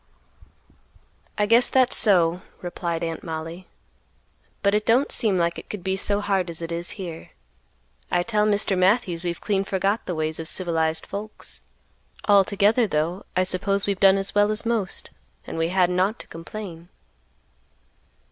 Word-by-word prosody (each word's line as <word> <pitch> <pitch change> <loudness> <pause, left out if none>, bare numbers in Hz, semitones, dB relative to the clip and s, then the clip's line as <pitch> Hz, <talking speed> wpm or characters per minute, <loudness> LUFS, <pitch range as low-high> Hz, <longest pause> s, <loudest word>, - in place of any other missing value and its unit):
"I 210 - +2
guess 235 +3 +4
that's 255 -2 +3
so," 180 -4 +5 0.2
replied 175 -1 -3
Aunt 165 -1 -4
Mollie, 165 +2 -6 1.0
"but 200 0 +3
it 210 0 +2
don't 245 +6 +2
seem 210 -5 +1
like 170 -1 0
it - - -14
could 205 -4 -6
be 190 0 0
so 205 +1 0
hard 195 -3 0
as 165 - -4
it 165 0 -5
is 170 +1 -2
here. 170 -4 -7 0.8
I 175 0 +1
tell 210 +1 +1
Mr. 205 -1 +1
Matthews 185 -2 +2
we've 170 -1 -3
clean 195 -2 0
forgot 195 +2 -1
the 180 - -2
ways 155 0 -2
of 160 - -5
civilized 160 -1 -1
folks; 210 +2 -7 0.7
altogether, 205 +3 +4
though, 170 +3 -2
I 185 - +3
suppose 195 +2 0
we've 200 -2 -1
done 195 0 +6
as 195 0 -2
well 205 0 +4
as 215 +2 -2
most, 225 -5 -1 0.3
and - - -7
we 165 0 0
hadn't 180 -1 +2
ought 200 +5 +1
to - - -7
complain." 170 0 -9
190 Hz, 160 wpm, -24 LUFS, 170-205 Hz, 1.0 s, done